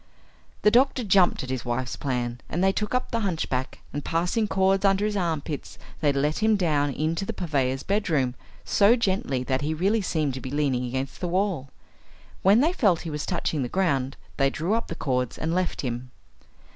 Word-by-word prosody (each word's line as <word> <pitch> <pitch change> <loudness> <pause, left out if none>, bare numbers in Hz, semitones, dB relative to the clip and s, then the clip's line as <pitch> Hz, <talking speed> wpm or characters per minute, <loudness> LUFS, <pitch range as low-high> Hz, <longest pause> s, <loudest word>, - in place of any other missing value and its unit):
The 210 - +6
doctor 255 +1 +3
jumped 190 -7 +3
at 130 - -5
his 130 -2 -2
wife's 120 +1 -2
plan, 125 -3 -3
and 175 +4 -1
they 195 - +5
took 210 +4 -2
up 250 - -1
the 230 - 0
hunchback, 160 - -2
and 145 0 -3
passing 180 +7 0
cords 195 0 +2
under 195 +1 +3
his 210 -1 -1
armpits 160 -5 -3 0.2
they 150 -3 +3
let 145 +2 0
him 220 0 +3
down 150 -7 +1
into 155 +6 -1
the - - -3
purveyor's 135 -6 -1
bed 205 +1 0
room 130 -6 +1 0.3
so 205 +3 +5
gently 190 - 0
that 130 +1 -1
he 155 +2 -1
really 200 +7 +2
seemed 155 -7 -1
to 130 - -6
be 130 - -6
leaning 135 -3 0
against 130 +2 -4
the 180 - -1
wall. 180 -6 -1 0.7
When 200 +5 +5
they 325 +5 +2
felt 200 - +2
he 165 - -5
was 150 0 -4
touching 165 -4 -1
the 125 - -2
ground 140 -8 0 0.2
they 135 -1 +3
drew 165 +8 -1
up 230 0 0
the 165 - -5
cords 125 -6 -1
and 160 +1 -2
left 185 0 -1
him. 125 -1 -4
160 Hz, 200 wpm, -26 LUFS, 135-195 Hz, 0.7 s, The